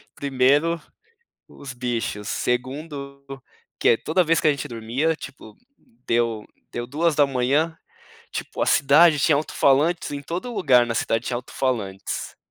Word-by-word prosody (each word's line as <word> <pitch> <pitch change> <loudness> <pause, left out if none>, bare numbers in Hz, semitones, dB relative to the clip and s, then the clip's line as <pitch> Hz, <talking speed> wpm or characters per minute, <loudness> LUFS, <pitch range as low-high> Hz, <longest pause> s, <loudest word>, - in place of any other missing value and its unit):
Primeiro, 145 +5 +2 0.7
os 140 -2 -10
bichos, 120 -4 -3
segundo, 140 +3 -3 0.6
que - - +2
é, - - +5
toda 160 +9 +1
vez 165 +1 +2
que - - +2
a - - +6
gente 140 -3 -3
dormia, 120 +8 -1
tipo, 135 -7 -11 0.5
deu 115 -2 0 0.3
deu 120 0 -4
2h, 145 0 +1 0.6
tipo, - - -5
a - - +1
cidade 150 +3 +5
tinha 145 +2 +4
auto-falantes, 150 +3 +1
em 145 - -4
todo 180 - -5
lugar 135 - +4
na 115 - -3
cidade 115 +1 -1
tinha 125 - -1
auto-falantes. 120 -6 -3
140 Hz, 135 wpm, -23 LUFS, 120-155 Hz, 0.7 s, a